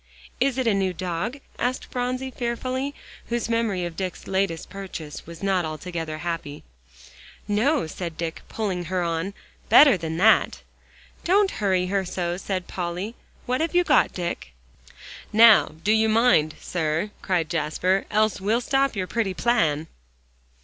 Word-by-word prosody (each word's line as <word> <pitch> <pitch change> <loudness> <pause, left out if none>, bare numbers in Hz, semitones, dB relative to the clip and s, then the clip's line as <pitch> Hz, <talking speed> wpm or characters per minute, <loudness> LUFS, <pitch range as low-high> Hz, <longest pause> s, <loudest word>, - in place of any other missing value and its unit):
"Is 265 0 +1
it 260 - 0
a 225 - +3
new 190 -2 0
dog?" 180 - -3 0.2
asked 250 +2 -1
Phronsie 255 +1 -3
fearfully, 255 +3 -3 0.3
whose 235 -1 -1
memory 225 -6 0
of 170 -1 -6
Dick's 185 -1 -5
latest 190 -4 -1
purchase 185 -7 -8
was 170 +2 -10
not 190 -2 +2
altogether 160 0 -5
happy. 165 -3 -5 0.8
"No," 245 - +2
said 165 0 -6
Dick, 165 -1 -4
pulling 190 -5 -2
her 180 +1 -1
on, 170 +4 -2 0.3
"better 280 -9 +8
than 160 -1 -4
that." 220 +5 +4 0.6
"Don't 390 +2 +3
hurry 190 -3 +2
her 195 +1 0
so," 175 -1 -2
said 190 -1 -3
Polly. 180 +4 -4 0.3
"What 255 +4 0
have 330 +2 -1
you 355 - +5
got, - - +4
Dick?" 170 - -5 0.8
"Now, 220 -5 +6
do 210 - +2
you 220 0 +3
mind, 215 -9 +3
sir," 165 +3 -2
cried 175 -4 0
Jasper, 170 +4 0
"else 215 -1 +1
well 215 +4 +2
stop 270 0 +1
your 190 -2 -1
pretty 195 -2 -1
plan." 165 -12 +1
195 Hz, 150 wpm, -24 LUFS, 170-235 Hz, 0.8 s, better